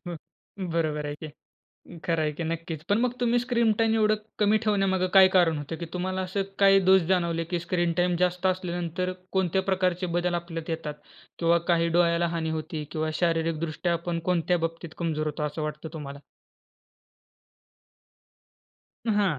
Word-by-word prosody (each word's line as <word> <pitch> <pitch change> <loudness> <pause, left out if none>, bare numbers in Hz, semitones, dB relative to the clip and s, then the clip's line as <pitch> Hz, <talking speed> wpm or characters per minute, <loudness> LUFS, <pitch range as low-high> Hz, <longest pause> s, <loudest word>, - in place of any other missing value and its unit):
हं, 175 -1 -6 0.6
बरोबर 155 -3 -1
आहे 145 - -3
की 155 - -8 0.4
अ, 170 - -15
खरं 165 -2 +1
आहे 150 -1 0
की 165 +3 -5
नक्कीच. 165 -1 -4
पण 205 +2 +3
मग 250 0 +1
तुम्ही 240 0 +3
स्क्रीन 235 -2 +2
टाईम 225 0 +3
एवढं 215 -1 +3 0.2
कमी 210 +1 +4
ठेवण्यामागे 195 -3 +2
काय 190 -1 +9
कारण 165 -4 +4
होतं, 145 +3 -5
की 170 - -6
तुम्हाला 185 +1 -2
असं 190 +2 -1 0.2
काही 195 -1 +6
दोष 190 0 +7
जाणवले, 170 -2 +1
की 175 +1 -2
स्क्रीन 175 0 0
टाईम 175 0 +2
जास्त 180 +1 +1
असल्यानंतर 180 -1 -1 0.2
कोणत्या 190 0 +1
प्रकारचे 185 -1 0
बदल 175 0 0
आपल्यात 165 -1 -4
येतात 160 -2 -3 0.4
किंवा 170 0 +3
काही 170 0 +2
डोळ्याला 170 0 +3
हानी 160 -1 -2
होती 155 -1 -5
किंवा 155 0 -1
शारीरिक 165 -2 +1
दृष्ट्या 165 +2 -1
आपण 170 0 -2
कोणत्या 175 0 +2
बाबतीत 165 0 -10
कमजोर 155 -3 -1
होतो. 150 0 -3
असं 150 +1 -4
वाटतं 150 +1 -4
तुम्हाला? 140 -3 -7 2.9
हां. 205 -8 +2
175 Hz, 165 wpm, -27 LUFS, 165-190 Hz, 2.9 s, काय